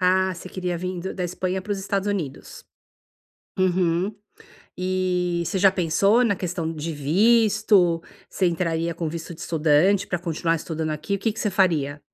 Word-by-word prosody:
Ah, 185 +1 +3
você 180 +2 -9
queria 180 -2 -3
vim 180 +1 -4
do 190 +2 -5
da 180 - -3
Espanha 185 +1 -2
para 205 - -3
os 200 - -2
Estados 200 +1 -2
Unidos? 165 -9 -5 0.9
Uhum. 185 +1 +1 0.6
E 180 -2 0
você 190 - -2
já 195 0 +6
pensou 195 +7 +3
na 205 -3 +2
questão 170 -3 -3
de 160 +1 -4
visto? 195 +2 +3 0.3
Você 185 - 0
entraria 170 -1 -1
com 165 -1 -3
visto 165 +1 -6
de 160 - -15
estudante 170 +3 +2
para 175 - -2
continuar 165 -1 -1
estudando 160 0 -4
aqui? 155 +6 -3
O - - -8
que 225 +2 0
que 220 - -7
você 210 - 0
faria? 160 -7 +1
180 Hz, 175 wpm, -24 LUFS, 165-195 Hz, 0.9 s, já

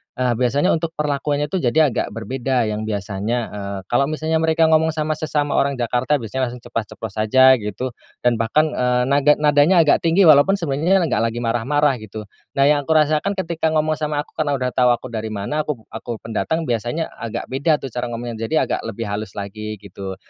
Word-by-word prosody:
eee, 125 -1 0
biasanya 140 +8 +2
untuk 165 0 -4
perlakuannya, 145 0 -1
tuh, 190 - 0
jadi 145 +3 +3
agak - - -1
berbeda, 125 +3 -1
yang 105 +1 -3
biasanya, 105 +3 -2
eee, 100 -1 -5
kalau 135 +3 +3
misalnya 155 +1 -1
mereka 160 0 +2
ngomong 160 0 +3
sama 155 0 -1
sesama 150 -2 -1
orang 140 0 +1
Jakarta 125 +3 0
biasanya 125 +3 -2
langsung 120 0 -10
ceplas-ceplos 115 -2 -5
saja, 130 +5 +6
gitu. 105 +5 -4 0.3
Dan 120 -1 +3
bahkan, 150 +7 +2
eee, 125 0 +1
naga 145 +1 +4
nadanya 150 +4 +4
agak 145 - +3
tinggi 170 +4 +4
walaupun 155 +5 +6
sebenernya 170 +4 +1
nggak 165 - 0
lagi 120 - -5
marah-marah, 130 +3 +1
gitu. 110 0 -8 0.3
Nah, 135 - +4
yang 145 -1 +2
kurasakan 155 +5 +2
ketika 170 -4 -2
ngomong 155 0 +1
sama 150 -1 -1
aku, - - -27
karena 145 -2 +1
udah 125 -1 -2
tau 125 -1 +2
aku 125 0 -10
dari 110 -1 -4
mana, 110 +10 -2
aku 125 -7 -4
aku 115 +1 -6
pendatang, 160 +9 -2
biasanya 120 +7 -2
agak 115 +1 -5
beda, 145 +4 +2
tuh, 135 - -6
cara 120 +1 -3
ngomongnya. 115 -1 -5
Jadi 160 - -2
agak - - -1
lebih 115 +1 -5
halus 100 0 -5
lagi, 105 +2 -5
gitu. 95 0 -7
135 Hz, 190 wpm, -20 LUFS, 115-155 Hz, 0.3 s, saja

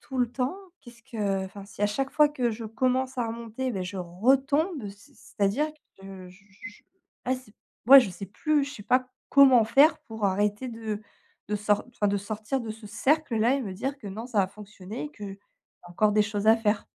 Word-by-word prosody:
tout 265 - -8
le 245 -2 +1
temps, 260 +8 -2 0.2
qu'est-ce 235 -1 -16
que» 200 -4 -2
enfin 195 +1 -10
si, 205 0 -8
à - - +5
chaque 270 +6 -2
fois, 300 -1 +5
que 255 -5 -1
je 225 +1 -7
commence 255 +3 -1
à 235 - 0
remonter, 235 +3 -4
ben 190 -2 -3
je 190 +2 -6
retombe. 270 - +1
C'est 200 +1 -15
c'est-à-dire 205 +10 -1 0.3
que 190 -1 -10
je 185 +2 -18
je 195 +4 -10
je - - -20 0.4
ah, 255 - +2
c'est 255 -5 -15 0.3
ouais, 275 +2 +11
je 220 -7 -2
sais 195 +2 -8
plus, 295 - 0
je 285 - -7
sais 205 - -10
pas 255 0 +2 0.2
comment 265 -5 +7
faire 275 +8 +5
pour 220 -6 -6
arrêter 205 +5 0
de 220 -2 -5 0.5
de 210 - 0
sort 210 0 +1
enfin 210 -4 -1
de 200 - +1
sortir 215 +6 -3
de 225 -2 -6
ce 215 0 -9
cercle 270 +3 +1
là 235 +5 +3
et - - -2
me 195 -4 -5
dire 270 +7 -4
que 210 - -11
non, 220 +5 -6
ça 220 -4 -1
va 185 - +2
fonctionner 210 +3 -9
et - - -11
qu'il 205 -6 -8
y - - -7 0.5
a 175 - -13
encore 210 +4 +2
des 210 0 +4
choses 210 0 -3
à 225 - +7
faire. 210 -2 0
220 Hz, 225 wpm, -27 LUFS, 205-260 Hz, 0.5 s, ouais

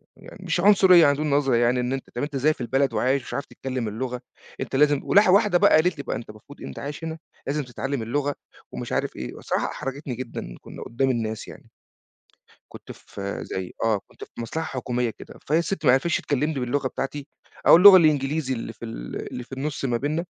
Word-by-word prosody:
يعني - - -14
مش 170 +1 0
عنصرية 190 -3 +7
عندهم 150 +2 +1
نظرة 140 -3 +2
يعني 120 +2 +2
إن 125 +1 -1
أنت 135 - -5
طب 120 - -2
أنت 145 -1 -4
إزاي 150 +4 +3
في - - -12
البلد 135 +3 +1
وعايش 130 +2 +1
ومش - - -9
عارف 140 - -3
تتكلّم 130 -3 -5
اللغة، 125 +3 -4 0.4
أنت - - -4
لازم 145 0 +4
ولح 205 -1 +4
واحدة 200 0 +5
بقى - - +4
قالت 165 +2 +3
لي 140 - -5
بقى: - - -3
"أنت 115 - -7
المفروض 110 +7 -14
أنت - - -7
عايش 145 +3 -6
هنا، 160 0 -4 0.3
لازم 145 +1 -1
تتعلّم 135 +1 -4
اللغة 145 +5 -1 0.4
ومش - - -6
عارف - - -1
إيه." 65 - -6
والصراحة - - -2
احرجتني 135 -1 -5
جدًا 115 - -7
كنا - - -9
قدّام 135 +3 -1
الناس 110 -3 -2
يعني. - - -13 1.0
كنت - - -10
في 100 0 -7
زي 95 -1 -5
آه، 110 -3 +2
كنت - - -11
في - - -26
مصلحة 160 +8 -3
حكومية 125 -3 -2
كده، - - -13
فهي 155 +3 +3
الست 170 0 -2
ماعرفتش 135 +6 +4
تكلّمني 145 0 -1
باللغة 130 +2 -1
بتاعتي 135 +2 -5 0.4
أو - - +9
اللغة 190 +2 +10
الإنجليزي 150 -4 +2
اللي 115 -1 -6
في 115 - -11
ال 115 - -6
اللي 125 - -5
في 130 - -22
النُص 140 +2 -4
ما 120 -3 +1
بيننا، 150 +7 -2
135 Hz, 205 wpm, -24 LUFS, 125-155 Hz, 1.0 s, اللغة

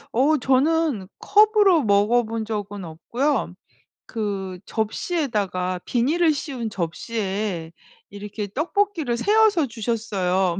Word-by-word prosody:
어 290 +5 +4
저는 270 - +1
컵으로 415 -5 +4
먹어본 220 +2 +2
적은 205 -2 -4
없고요. 230 - -2 0.5
그 195 -5 -4
접시에다가 210 - -2
비닐을 310 +7 +2
씌운 260 -6 -4
접시에 190 -1 -3 0.4
이렇게 205 +1 -6
떡볶이를 335 -4 0
세어서 410 - +3
주셨어요. 195 -6 -1
230 Hz, 240 characters per minute, -23 LUFS, 200-300 Hz, 0.5 s, 어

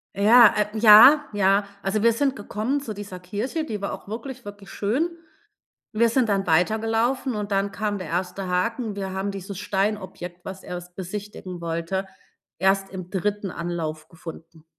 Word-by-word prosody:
Ja, 220 +4 +8 0.3
äh, - - -4
ja, 230 +8 +9
ja. 200 0 +3 0.2
Also 195 +2 0
wir 230 +1 +4
sind 270 +3 0
gekommen 220 +6 -2
zu 230 -6 -5
dieser 200 -3 -8
Kirche, 210 - -3
die 220 -9 -4
war 200 - -3
auch - - -9
wirklich, 250 +4 -7
wirklich 205 -1 -10
schön. 250 +12 0 0.8
Wir 230 +1 +3
sind 235 -1 +1
dann 195 -1 +1
weitergelaufen, 225 +8 +1
und 205 -1 -4
dann 195 0 +1
kam 205 -1 -2
der 185 - -6
erste 180 +3 -3
Haken. 220 +4 -1
Wir 195 -1 -4
haben 190 +1 -2
dieses 195 0 -7
Steinobjekt, 190 -4 -3
was 190 0 -7
er 180 - -5
s 175 0 -11
besichtigen 190 -1 -7
wollte, 170 +3 -2 0.5
erst 195 +1 +2
im 185 -2 -8
3. 200 +1 -2
Anlauf 165 -3 -4
gefunden. 165 -1 -11
200 Hz, 165 wpm, -24 LUFS, 185-220 Hz, 0.8 s, ja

